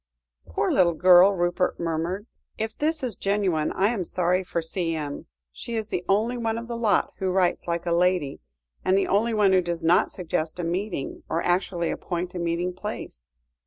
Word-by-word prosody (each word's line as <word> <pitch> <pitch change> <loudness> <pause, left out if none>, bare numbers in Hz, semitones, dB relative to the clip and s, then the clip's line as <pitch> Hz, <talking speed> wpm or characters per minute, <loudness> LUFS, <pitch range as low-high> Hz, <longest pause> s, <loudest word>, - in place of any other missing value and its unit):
"Poor 85 - 0
little 170 -3 +3
girl," 185 +3 +7
Rupert 175 +1 0
murmured, 170 +4 -2 0.3
"if 220 0 -3
this 310 0 0
is 240 -6 -2
genuine, 195 -6 0
I 195 +2 +2
am 220 -6 -1
sorry 180 +1 0
for 175 - -2
C.M. 165 -3 -3 0.2
She 235 - -6
is 220 -1 -3
the 175 - -2
only 220 +5 +2
one 225 -1 -1
of 230 0 -6
the 235 - -4
lot 225 -3 +1
who 190 -1 0
writes 185 -1 +1
like 170 0 -2
a 170 - -1
lady, 175 -4 +1 0.4
and 190 - +3
the 195 - +2
only 220 +3 +1
one 200 -3 +4
who 185 - +5
does 170 -1 -3
not 165 +2 +4
suggest 160 -3 -3
a - - -2
meeting, 175 -3 -3
or 165 - -1
actually 175 -1 0
appoint 180 0 -4
a 180 - -4
meeting 170 +1 -1
place. 180 - -7
180 Hz, 190 wpm, -25 LUFS, 170-205 Hz, 0.4 s, girl